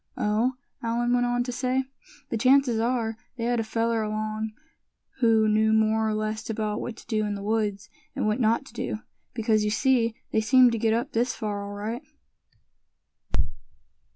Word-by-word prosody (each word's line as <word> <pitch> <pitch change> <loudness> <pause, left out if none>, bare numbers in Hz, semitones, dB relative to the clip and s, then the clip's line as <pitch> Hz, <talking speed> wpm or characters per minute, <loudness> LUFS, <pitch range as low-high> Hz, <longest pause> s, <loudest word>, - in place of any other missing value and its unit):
"Oh!" 220 +5 +1 0.3
Allan 240 +1 0
went 245 0 +3
on 245 0 +1
to 250 - -4
say, 255 +1 0 0.5
"the - - -1
chances 255 -1 +4
are, 230 -1 0 0.2
they 230 - -3
had 240 0 +1
a - - +1
fellow 225 0 0
along 215 0 -3 0.7
who 225 -3 +4
knew 220 +1 +3
more 220 0 +3
or 215 - 0
less 215 +1 -3
about 215 -1 -2
what 235 - -5
to - - -13
do 215 -2 0
in 205 -1 -2
the 200 - -6
woods, 210 -2 -1 0.3
and 275 - -1
what 215 +3 +1
not 230 +3 +2
to - - -14
do; - - -3 0.4
because 220 -2 +2
you 210 - +1
see, 230 0 +2 0.2
they 220 - +2
seemed 250 +3 +6
to 230 - -1
get 225 0 +2
up 245 +5 -2
this 240 +2 0
far 205 -2 -3
all 200 0 -6
right." 215 +4 -4
225 Hz, 180 wpm, -26 LUFS, 215-240 Hz, 0.7 s, seemed